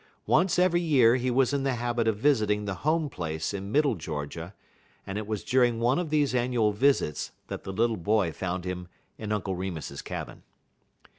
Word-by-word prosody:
Once 180 +2 +3
every 180 -1 +3
year 130 -8 +5
he 130 0 0
was 130 +2 +2
in 140 - +1
the 135 -2 0
habit 120 -1 -1
of 110 -2 +1
visiting 105 -5 +2
the 100 - -2
Home 155 +1 +1
Place 80 - -4
in 100 0 -5
Middle 145 +1 +3
Georgia, 80 +3 -6 0.5
and 95 +2 -4
it 105 - -6
was 110 -2 -3
during 120 -3 +2
one 120 +6 +2
of 175 -3 -3
these 145 -3 +2
annual 120 -3 +2
visits 105 - +1 0.2
that - - -6
the 95 - -4
little 115 +3 +1
boy 100 0 +1
found 90 +1 -4
him 90 -1 -4 0.3
in 105 -1 -4
Uncle 95 -3 -1
Remus's 85 -6 -5
cabin. - - -7
115 Hz, 190 wpm, -27 LUFS, 95-135 Hz, 0.5 s, year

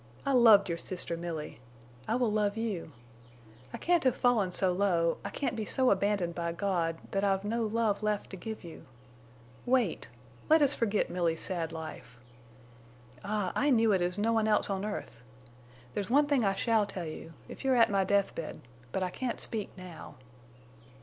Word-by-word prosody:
I 275 - +1
loved 225 -6 +7
your 170 -1 -3
sister 180 -2 -3
Milly. 165 -7 -6 0.5
I 225 - +1
will 245 -3 +1
love 210 0 0
you. 210 -8 -3 0.8
I - - -5
can't 350 -1 +2
have 255 -2 +3
fallen 235 -7 +2
so 185 +1 +1
low—I 180 -3 +1
can't 280 - -2
be 220 - -2
so 260 +4 +2
abandoned 200 -3 +1
by 170 -1 -3
God—that 175 0 -2
I've 195 -1 +1
no 225 +2 -1
love 215 -2 0
left 210 -1 -1
to - - -6
give 220 +4 -7
you. 170 -2 -11 0.8
Wait! 245 -8 +1 0.4
Let 315 -1 +6
us 285 0 +3
forget 215 -3 0
Milly's 170 -2 0
sad 170 -4 -2
life. 160 -6 -8 1.1
Ah, 205 -2 -1
I 290 - +2
knew 230 -4 +4
it 190 -3 +2
as 175 +2 0
no 225 +3 +1
one 220 -1 +2
else 210 -1 +2
on 195 +1 -2
earth! 205 - -5 0.7
There's 205 0 -3
one 285 +4 +5
thing 285 -4 +2
I 195 -1 +2
shall 220 -1 +2
tell 180 -4 -5
you—if 160 - -10
you 270 - +2
are - - +3
at 230 -2 +5
my 195 -1 +3
death 200 +1 +1
bed, 165 - -6 0.3
but 190 - -1
I 180 - -2
can't 255 +3 -3
speak 215 -3 -4
now." 180 -3 -10
200 Hz, 180 wpm, -30 LUFS, 180-230 Hz, 1.1 s, loved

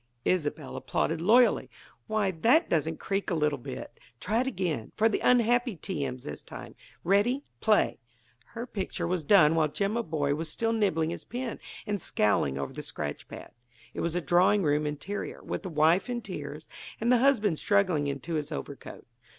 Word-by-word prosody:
Isobel 150 -5 -1
applauded 165 0 -1
loyally. 235 +7 +4 0.4
"Why, 215 -3 +1
that 235 - +3
doesn't 160 0 0
creak 195 0 -2
a 175 - 0
little 150 -3 +1
bit! - - -8 0.2
Try 220 +5 +1
it 260 - -2
again; 175 - -2
for 220 - +4
the 220 - 0
unhappy 245 -1 +3
T. 165 -3 -4
M.'s, 130 -2 -5
this 75 - -6
time. - - -10 0.3
Ready? 210 +9 +2 0.2
Play!" - - +2 0.6
Her 230 +1 -4
picture 200 -6 -4
was 175 -1 -1
done 160 -2 +6
while 160 -2 +3
Jimaboy 160 -7 -1
was 160 0 -4
still 225 +5 0
nibbling 165 -8 +1
his - - -6
pen 245 -1 -5 0.3
and 205 -3 -2
scowling 85 - +1
over 70 -1 -4
the - - -6
scratch 75 -1 -5
pad. - - -10 0.4
It - - -6
was 170 0 -1
a 180 - 0
drawing 185 +4 +3
room 150 0 +1
interior, 150 +8 -5
with - - -4
the 190 - -6
wife 160 +6 +3
in 240 -1 -3
tears - - -7 0.3
and 235 +2 +1
the 250 - +5
husband 220 - +3
struggling 185 -8 +2
into 140 +4 -4
his 150 -1 -2
overcoat. 145 -2 -7
180 Hz, 175 wpm, -28 LUFS, 150-220 Hz, 0.6 s, done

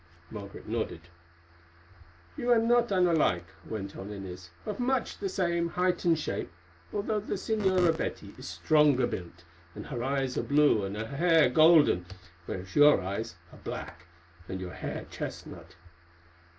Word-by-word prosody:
Margaret 100 -2 -9
nodded. 110 -7 -3 1.3
"You 245 - -3
are 240 - +6
not 235 0 +3
unlike," 165 - +2 0.2
went 100 -3 -5
on 95 - -7
Inez, 90 -3 -8 0.2
"of 210 +1 -4
much 255 +1 0
the 395 - -2
same 170 - 0
height 180 +1 0
and 165 -2 +4
shape, 125 -10 -3 0.4
although 210 +1 -1
the 210 - -4
Señora 185 -6 +2
Betty - - -5
is - - -9
stronger 140 - +3
built, 85 -1 -6 0.3
and - - -7
her 120 -4 -4
eyes 135 -1 -1
are - - +1
blue 145 -7 +3
and 100 +2 -5
her 110 - -3
hair 160 +1 +3
golden, 155 - +5 0.4
whereas 95 0 -6
your 145 -5 +7
eyes 100 +2 -4 0.2
are - - -14
black 85 - -7 0.4
and 95 - -4
your 90 -1 -6
hair - - -5
chestnut. - - -7
145 Hz, 150 wpm, -29 LUFS, -, 1.3 s, your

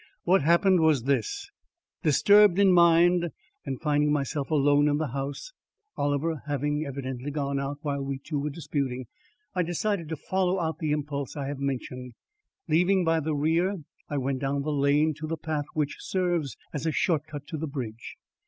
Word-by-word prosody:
What 185 +2 +4
happened 170 +5 +4
was 155 -6 +3
this: 135 -4 -1 0.5
Disturbed 200 +5 +5
in 195 -2 +5
mind, 175 0 +5 0.4
and 135 -2 -3
finding 150 -1 +2
myself 145 0 -1
alone 145 -1 +4
in 145 0 +2
the 155 -2 -2
house, 140 - -5 0.4
Oliver 145 +1 -1
having 145 +1 -1
evidently 130 -1 -5
gone 140 -1 -2
out 140 +1 -3
while 140 -2 -2
we 135 0 -3
two 145 +2 -4
were 150 +2 -2
disputing, 140 -4 -3 0.5
I 180 - +1
decided 175 0 -1
to 160 - -2
follow 185 +4 0
out 160 -2 -2
the 155 - -2
impulse 145 -2 -3
I 140 - -3
have 145 -1 -5
mentioned. 125 -3 -4 0.5
Leaving 180 +3 +3
by 165 0 +3
the 155 0 -2
rear, 165 +7 +1 0.3
I 145 - -2
went 135 0 -1
down 140 +1 -1
the 155 - -2
lane 145 +2 +2
to 155 - -4
the 165 +1 -3
path 155 -2 -3
which 150 -2 -1
serves 175 -8 -1 0.2
as 150 +2 -3
a - - +2
short 155 -1 0
cut 145 -2 -8
to 160 - -4
the 160 +1 -3
bridge. 120 -6 -6
150 Hz, 180 wpm, -27 LUFS, 140-165 Hz, 0.5 s, Disturbed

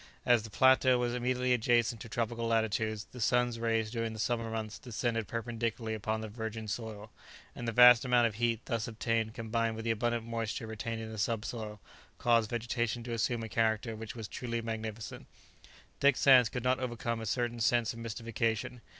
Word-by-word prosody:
As 120 -2 +5
the 110 - -9
plateau 130 +2 +5
was 120 -1 0
immediately 125 +1 +1
adjacent 120 -1 +2
to 115 - -8
tropical 115 0 -2
latitudes, 110 -1 0
the 125 - -8
sun's 120 0 +2
rays 115 -1 0
during 115 -1 -2
the - - -8
summer 115 0 -1
months 110 -1 -4
descended 115 -2 -2
perpendicularly 115 -1 -3
upon 110 +1 -2
the 110 - -5
virgin 110 0 -5
soil, 110 -1 -5 0.4
and 120 - -5
the - - +1
vast 125 +1 +8
amount 125 -2 +4
of 115 - 0
heat 115 +1 0
thus 115 -2 -2
obtained 115 0 -1
combined 115 0 -1
with 110 +1 -6
the 115 - +2
abundant 120 +1 -1
moisture 115 +1 -3
retained 110 +1 -4
in 110 - -7
the 110 - -6
subsoil, 110 -1 -3 0.4
caused 115 -3 +3
vegetation 120 0 -2
to 120 0 -4
assume 115 0 0
a - - -4
character 110 +1 0
which 110 +1 -7
was 110 -3 -6
truly 115 0 -4
magnificent. 110 -1 -5 0.7
Dick 140 -2 +4
Sands 130 -4 +6
could 125 0 -4
not 130 0 +2
overcome 120 -2 -3
a 110 - -5
certain 120 +1 -1
sense 120 0 +2
of 115 - -10
mystification. 115 +1 -2
115 Hz, 185 wpm, -31 LUFS, 110-120 Hz, 0.7 s, vast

